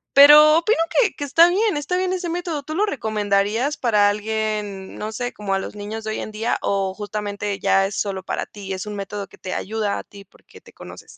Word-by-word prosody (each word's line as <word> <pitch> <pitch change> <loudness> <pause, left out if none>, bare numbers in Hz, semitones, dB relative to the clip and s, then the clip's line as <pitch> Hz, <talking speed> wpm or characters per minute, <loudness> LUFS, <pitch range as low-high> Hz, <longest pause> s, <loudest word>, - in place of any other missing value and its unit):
Pero, 300 +2 +9
opino 385 +7 +1 0.2
que 430 -6 +1
que 290 - -5
está 330 +5 +5
bien. 410 +2 +1
Está 295 +5 -2
bien 370 0 0
ese 360 -2 -3
método. 335 -3 -3
¿Tú 310 +2 -6
lo 415 +5 +2
recomendarías 220 - 0
para 210 -4 +3
alguien? 210 -2 -3
No 215 +1 -5
sé 245 +2 -4
como 205 -2 -3
a - - 0
los 195 - -7
niños 210 +2 -6
de 215 - -3
hoy - - -3
en - - -6
día, 225 +3 -1
o 195 -1 -1
justamente, 205 0 -4
¿ya 195 0 +3
es 200 - -7
sólo 195 -2 -2
para - - -3
ti? 195 -2 -8
¿Es 190 +2 -5
un 210 - -6
método 200 0 -5
que - - -18
te 185 - -5
ayuda 215 -1 -2
a - - -6
ti, 200 -1 -14
porque - - -19
te - - -17
conoces? - - -11
215 Hz, 230 wpm, -21 LUFS, 205-290 Hz, 0.2 s, Pero